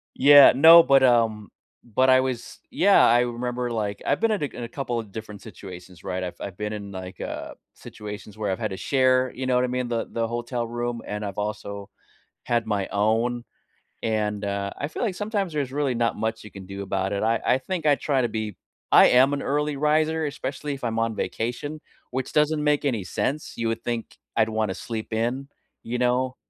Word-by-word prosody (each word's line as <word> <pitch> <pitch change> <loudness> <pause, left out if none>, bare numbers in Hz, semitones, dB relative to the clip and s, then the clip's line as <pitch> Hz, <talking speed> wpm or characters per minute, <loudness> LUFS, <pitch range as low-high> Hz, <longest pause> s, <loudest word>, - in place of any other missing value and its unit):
Yeah, 145 +1 +9
no, 165 +5 +9
but, 135 -3 +5
um, 115 -4 +3 0.4
but 130 +3 +1
I 130 - +6
was 130 -2 -4
yeah, 200 +1 +5
I 120 +1 +5
remember, 125 0 -2
like, 105 -3 -3
I've - - +1
been 225 -1 +2
in 205 -8 -1
a - - +2
c - - -16
in 120 - -5
a - - -6
couple 125 -2 -3
of 110 -3 -8
different 105 -2 -8
situations, 95 -4 -11
right? 95 -1 -3
I've 90 - -5
I've 95 -3 -6
been 105 0 -3
in, 100 -1 -7
like, 95 -1 -8
uh, - - -5 0.2
situations 105 0 -10
where 105 -3 -1
I've 95 - -3
had 110 -3 -2
to 95 - -5
share, 130 0 +2
you 130 +1 -5
know 130 - +2
what 125 - +3
I - - -2
mean, 125 0 -2
the 115 -1 -2
the 115 -1 -1
hotel 120 0 -3
room, 120 0 -3
and 105 0 -4
I've 100 -1 -6
also 100 -1 -5 0.6
had 120 -1 0
my 100 -3 -1
own, 115 +4 +1 0.6
and, 105 -2 -1
uh, 100 0 -2
I 145 - -3
feel 155 - -6
like 215 -6 0
sometimes 205 -3 -2
there's 145 -4 -2
really 140 -2 0
not 115 -1 0
much 110 +1 -3
you 105 - -10
can 100 -1 -10
do 100 +1 -6
about 95 0 -2
it, 100 - -2
I 115 +1 +1
I 130 - +4
think 165 +4 -4
I 145 - +6
try 135 -3 0
to 120 - 0
be 110 -3 -4 0.4
I - - +8
am 130 +3 +5
an 140 - -4
early 150 +1 -1
riser, 155 +2 +1
especially 145 +1 -4
if 135 - -11
I'm 115 -1 -1
on 115 0 0
vacation, 125 +9 -4 0.3
which 130 0 -4
doesn't 150 0 +2
make 150 -1 +2
any 115 -9 -1
sense, 145 - -3
you 115 -1 -1
would 115 +1 -3
think 120 -2 -4 0.2
I'd 110 - +3
want 110 -2 -1
to - - -3
sleep 110 +1 -6
in, 120 +5 -1 0.3
you 120 +2 -4
know? 125 +1 +1
120 Hz, 220 wpm, -24 LUFS, 105-135 Hz, 0.6 s, Yeah